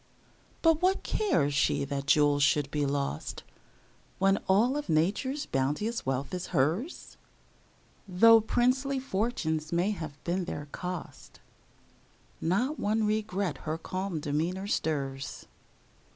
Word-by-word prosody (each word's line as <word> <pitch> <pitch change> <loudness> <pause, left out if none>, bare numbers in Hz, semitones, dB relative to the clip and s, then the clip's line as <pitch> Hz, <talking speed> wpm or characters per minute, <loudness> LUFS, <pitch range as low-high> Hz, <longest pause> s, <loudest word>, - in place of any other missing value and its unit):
But 325 -1 +4
what 375 +2 +2
cares 270 - +1
she 140 - +2
that 140 0 -4
jewels 145 -1 +4
should 145 0 +2
be 145 -1 0
lost, 140 - -3 0.7
When 195 +1 +3
all 225 +8 +4
of 295 0 -4
Nature's 205 - 0
bounteous 150 - -1
wealth 135 +5 -2
is 180 0 -3
hers? 170 - -1 0.9
Though 225 +5 +6
princely 260 +5 +1
fortunes 190 - -2
may 175 +4 +1
have 160 -7 -6
been 180 +1 -1
their 145 -3 -5
cost, 180 -2 -7 1.0
Not 240 - 0
one 215 +1 +1
regret 210 -3 -1
her 155 0 -3
calm 185 0 -4
demeanor 160 +6 -2
stirs. 135 -8 -2
180 Hz, 120 wpm, -29 LUFS, 145-225 Hz, 1.0 s, Though